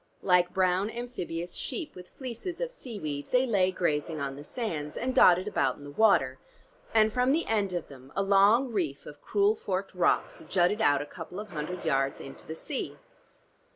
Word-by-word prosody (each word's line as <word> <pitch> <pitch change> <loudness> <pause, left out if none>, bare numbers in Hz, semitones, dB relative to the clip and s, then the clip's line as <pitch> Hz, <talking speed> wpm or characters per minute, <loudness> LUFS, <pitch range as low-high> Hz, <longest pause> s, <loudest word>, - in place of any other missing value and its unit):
Like 180 -2 +4
brown 185 +1 +2
amphibious 180 -8 -5
sheep 335 -6 -5
with 180 0 -12
fleeces 260 +7 -6
of - - -2
seaweed 195 - -6
they 250 +1 +3
lay 195 -6 +2
grazing 160 -3 -1
on 140 -1 -3
the 145 - -9
sands, 155 -8 -4
and 255 +1 -1
dotted 180 -2 +6
about 135 -10 +1
in 145 - -13
the 145 - -9
water, 145 -9 +3 0.5
and 220 -1 +4
from 250 +2 +3
the 330 +2 +1
end 205 -4 0
of 175 -2 -3
them 135 -1 -14
a 195 - +1
long 205 +6 +4
reef 155 -9 -2
of 145 -1 -11
cruel 205 0 +2
forked 195 -2 -3
rocks 180 -2 +1
jutted 190 +4 +2
out 145 -6 +3
a - - -9
couple 165 +5 -8
of 215 0 -7
hundred 175 +1 -5
yards 135 0 +1
into 135 - -10
the 160 - -5
sea. 270 - -4
185 Hz, 190 wpm, -29 LUFS, 150-220 Hz, 0.5 s, dotted